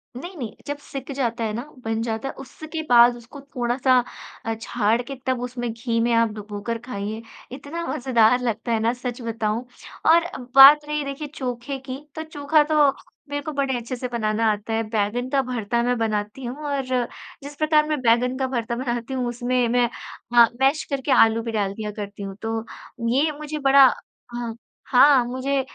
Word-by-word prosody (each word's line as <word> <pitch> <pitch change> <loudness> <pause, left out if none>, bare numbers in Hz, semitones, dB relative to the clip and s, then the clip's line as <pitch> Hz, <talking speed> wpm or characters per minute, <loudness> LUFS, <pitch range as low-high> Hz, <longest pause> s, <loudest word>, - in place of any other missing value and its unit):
नहीं, 350 +8 -8
नहीं। 230 -6 -5
जब 290 0 -3
सिक 275 0 -7
जाता 235 -3 -1
है 215 -1 -2
ना, 235 - -3 0.2
बन 225 0 -1
जाता 225 +3 -3
है, - - -5
उसके 315 +4 -7
बाद 240 0 +7
उसको 240 +4 -12
थोड़ा-सा 255 -1 +1 0.5
अ, 225 - -1
छाड़ 230 +1 +1
के 270 +3 -7
तब 255 -2 0
उसमें 245 -1 -4
घी 230 0 -2
में 235 0 +2
आप 230 -1 +3
डुबोकर 210 +2 -5
खाइए, 215 -1 -4 0.3
इतना 290 +6 -6
मज़ेदार 245 -1 +3
लगता 230 0 -2
है 225 - +2
ना 230 +2 +1
सच 250 0 -6
बताऊँ 225 +1 -2 0.5
और 335 +1 +5 0.3
बात 290 +2 +10
रही 300 -1 -1
देखिए 275 +2 -5
चोखे 255 +1 -4
की, 265 0 -7 0.2
तो 315 - -4
चोखा 300 0 +2
तो 295 -2 +5 0.4
मेरे 290 0 -2
को 310 - -4
बड़े 275 -2 -1
अच्छे 240 +2 -5
से 250 +1 -4
बनाना 220 -2 0
आता 210 +2 -4
है, 225 0 0
बैंगन 225 +4 -1
का 275 0 +2
भर्ता 235 -2 -1
मैं 245 0 +1
बनाती 215 +2 -2
हूँ 245 +2 -4
और 280 -1 0 0.6
जिस 285 +1 -8
प्रकार 305 0 +3
मैं 305 -2 -1
बैंगन 250 +2 +2
का 265 -1 0
भर्ता 235 -2 -2
बनाती 240 0 -3
हूँ 250 -2 -1
उसमें 245 0 0
मैं 245 -1 +2 0.4
हाँ, 235 -1 +7
मैश 275 +3 +3
करके 275 0 -1
आलू 225 -2 +5
भी 230 - -4
डाल 200 -3 -1
दिया 210 0 -5
करती 205 -1 -7
हूँ। 195 -1 -6
तो 225 0 -2 0.5
ये 290 +5 +2
मुझे 305 0 -5
बड़ा 275 0 +7 0.5
हाँ 235 -2 -4 0.3
हाँ, 265 -1 +6
मुझे 265 +2 -1
245 Hz, 190 wpm, -23 LUFS, 230-275 Hz, 0.6 s, बात